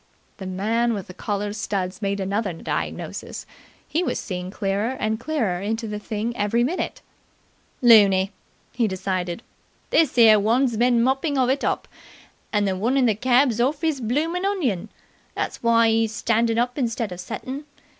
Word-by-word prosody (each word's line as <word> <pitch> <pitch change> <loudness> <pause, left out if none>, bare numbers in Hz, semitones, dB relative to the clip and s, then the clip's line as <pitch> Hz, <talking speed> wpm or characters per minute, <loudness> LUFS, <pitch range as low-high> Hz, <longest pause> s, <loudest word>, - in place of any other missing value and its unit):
'" - - -38
The 190 - -6
man 225 +5 0
with 195 - -5
the 185 - -11
collar 205 +1 -3
studs 195 -3 -3
made 200 0 -1
another 195 0 -1
diagnosis. 165 - -5 0.4
He 325 - 0
was - - -1
seeing 180 -3 -5
clearer 205 +6 -2
and 220 0 -1
clearer 235 - -1
into 225 +3 -2
the 210 0 -4
thing 220 +2 -3
every 225 +2 +1
minute. 325 +9 -3 0.8
"Looney!" 200 -5 +6 0.4
he 235 -3 +1
decided. 185 0 -3 0.5
"This 310 -6 +3
'ere 220 -3 +7
one's 235 +4 +2
bin 240 +1 +3
moppin' 270 +3 +1
of 255 -1 +3
it 275 +2 -1
up, - - -1 0.6
and 205 -2 +1
the 190 - 0
one 235 +8 0
in 260 - +4
the 225 - +4
keb's 245 +1 +2
orf 285 +5 0
'is 310 -5 0
bloomin' 310 - -1
onion. 260 - -1 0.5
That's - - -3
why 230 -1 +4
'e 225 0 +2
's 220 - -9
standin' 230 +1 +1
up 245 +3 0
instead 230 -4 -1
of 180 - -7
settin'. 265 +9 -6
225 Hz, 170 wpm, -23 LUFS, 200-250 Hz, 0.8 s, ere